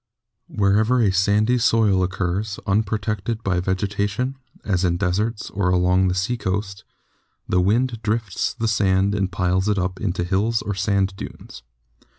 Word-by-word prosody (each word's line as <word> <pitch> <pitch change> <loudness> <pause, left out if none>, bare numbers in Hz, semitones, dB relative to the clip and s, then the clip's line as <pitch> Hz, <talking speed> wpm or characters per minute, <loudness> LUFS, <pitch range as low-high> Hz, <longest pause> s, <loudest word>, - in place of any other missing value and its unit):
Wherever 105 +5 +2
a 105 -5 +3
sandy 105 +6 +2
soil 110 -5 +3
occurs, 95 +3 -2
unprotected 105 +1 -1
by 95 -3 0
vegeta 100 +2 -1
tion, 125 +6 -3 0.3
as 95 -4 0
in 85 -1 +1
deserts 105 +5 -1
or 95 -2 0
along 90 +1 +3
the 90 - 0
seacoast, 95 -1 -2 0.6
the 90 - +2
wind 115 +4 +1
drifts 110 -2 -1
the 115 -2 -1
sand 100 -2 +2
and 100 -2 -1
piles 95 +2 0
it 105 - +1
up 90 0 -2
into 90 -3 -1
hills 105 +5 0
or 100 - -2
sand 95 0 0
dunes. - - -9
100 Hz, 150 wpm, -22 LUFS, 95-110 Hz, 0.6 s, a